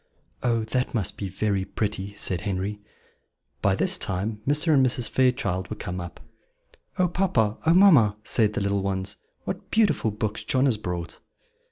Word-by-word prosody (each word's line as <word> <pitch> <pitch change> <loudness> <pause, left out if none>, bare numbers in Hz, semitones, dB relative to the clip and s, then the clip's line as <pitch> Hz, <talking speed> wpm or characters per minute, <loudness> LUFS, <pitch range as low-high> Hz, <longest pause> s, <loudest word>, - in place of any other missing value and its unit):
'" - - -42
"Oh, 115 -2 +1
that 125 +3 -2
must 100 -7 -1
be 100 - -5
very 100 0 -1
pretty," 100 0 -4
said 90 -3 +1
Henry. 100 +1 -3 0.8
By 95 -1 +3
this 185 - +2
time 105 +2 -2
Mr. 150 +3 +3
and 135 -2 +5
Mrs. 125 -2 +1
Fairchild 120 -8 0
were 110 - -4
come 90 -3 -5
up. 85 -1 -9 0.8
"Oh, 185 - +3
papa! 130 - 0
oh, 165 - +6
mamma!" 145 - +6
said 110 -1 +1
the - - -2
little 100 0 0
ones, 95 +1 -2 0.3
"what - - -6
beautiful 215 - +2
books 105 +1 -3
John 130 +1 +1
has 125 -6 +2
brought!" 90 -5 -5
105 Hz, 170 wpm, -25 LUFS, 95-130 Hz, 0.8 s, oh